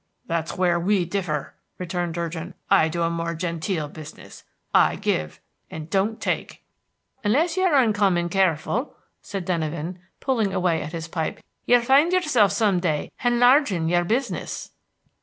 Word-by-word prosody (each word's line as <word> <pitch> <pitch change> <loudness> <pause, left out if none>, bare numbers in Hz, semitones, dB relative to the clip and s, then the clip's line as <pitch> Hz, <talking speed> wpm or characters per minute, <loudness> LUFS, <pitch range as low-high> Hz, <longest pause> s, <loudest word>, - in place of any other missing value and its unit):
"That's 165 0 -3
where 175 -2 +2
we 185 +1 +1
differ," 170 -5 -3 0.2
returned 175 -2 -3
Durgin. 170 +1 -4 0.2
"I 160 - +5
do 170 +1 -2
a 165 - +1
more 170 0 -3
genteel 165 -1 -2
business; 155 0 -12 0.3
I - - +4
give, 75 0 -2 0.3
and 155 +1 -8
don't 205 +3 0
take." - - -3 0.6
"Unless 305 +11 +2
you're 370 -4 +2
uncommon 205 -8 +3
careful," 190 - 0 0.3
said 195 -3 -5
Denyven, 170 0 -3 0.2
pulling 225 -7 0
away 175 -3 +1
at 155 - -7
his 165 -1 -5
pipe, 160 -1 -3 0.3
"you'll 245 0 +5
find 275 +7 +4
yourself 265 - +3
some 200 -3 +2
day 155 -4 -1
henlarging 245 - +3
your 175 0 +3
business." 230 +10 -3
180 Hz, 140 wpm, -24 LUFS, 165-220 Hz, 0.6 s, I